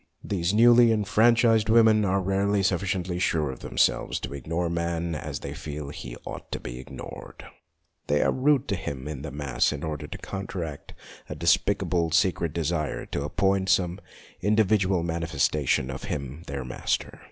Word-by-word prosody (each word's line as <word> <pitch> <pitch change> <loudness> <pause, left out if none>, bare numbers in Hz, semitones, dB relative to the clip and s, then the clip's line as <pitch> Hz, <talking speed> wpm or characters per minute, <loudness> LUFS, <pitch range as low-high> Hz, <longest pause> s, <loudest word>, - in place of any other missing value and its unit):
These 90 -3 -1
newly 120 +2 +6
enfranchised 110 +1 +3
women 110 -1 +5
are 95 0 +1
rarely 100 +1 +1
sufficiently 90 -1 -1
sure 80 -5 +1
of 65 - -10
themselves - - +1
to - - -5
ignore 80 +5 -2
man 85 0 -2
as 75 -1 -5
they - - -5
feel 75 -2 -6
he 65 -4 -8
ought - - -8
to - - -2
be - - -7
ignored. 65 - -10 0.6
They 75 0 +2
are - - +2
rude 140 0 +2
to 100 - +1
him 70 -6 -5
in 75 -3 -5
the 80 - -5
mass 70 -2 0
in 75 -2 -5
order 75 -3 -4
to - - -7
counteract 90 -6 -6 0.3
a - - -4
despicable, 85 -2 +2
secret 85 -1 +2
desire 80 -1 -2
to 70 - -3
appoint 95 +4 +1
some 90 -1 +2 0.4
individual 100 -3 +2
manifesta 80 -3 -1
tion 65 +2 +2
of 65 - -6
him 70 +3 -5
their 70 -2 -4
master. 65 - -2
85 Hz, 165 wpm, -26 LUFS, 75-100 Hz, 0.6 s, newly